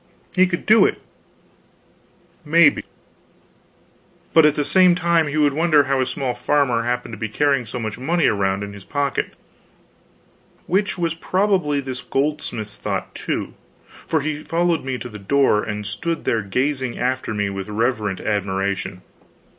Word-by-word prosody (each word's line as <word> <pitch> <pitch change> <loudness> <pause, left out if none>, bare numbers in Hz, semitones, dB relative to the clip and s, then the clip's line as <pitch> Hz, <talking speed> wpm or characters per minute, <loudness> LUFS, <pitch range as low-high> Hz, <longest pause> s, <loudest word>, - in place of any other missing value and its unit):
He 185 0 +5
could 175 -1 -3
do 220 +1 +6
it, - - -4 1.4
maybe; 160 0 +4 1.5
but 160 -2 +7
at 150 - +1
the 145 - 0
same 185 +1 +5
time 170 -2 +2
he 145 +1 -3
would 145 -2 +3
wonder 155 -1 +4
how 135 -1 0
a 130 - 0
small 130 -1 -2
farmer 125 -1 +1
happened 125 +1 -2
to - - -7
be 110 -2 -3
carrying 140 0 +1
so 120 - -5
much 110 -1 -4
money 165 +5 +1
around 100 -1 +1
in 100 0 -7
his 100 -1 -11
pocket; 140 +2 -2 1.3
which 195 +2 0
was 170 -2 0
probably 180 -4 0
this 130 -2 -6
goldsmith's 135 -7 -2
thought, - - -4
too; - - -4 0.5
for 160 - +1
he 155 +1 -3
followed 170 0 0
me 130 -1 -3
to 125 - -7
the 105 -3 -10
door 120 0 +2
and 105 0 -4
stood 165 +10 -3
there 115 - +1
gazing 130 +5 -1
after 130 0 -1
me 100 -1 -1
with 95 +1 -6
reverent 105 -3 -1
admiration. 100 -2 -2
135 Hz, 155 wpm, -21 LUFS, 110-160 Hz, 1.5 s, but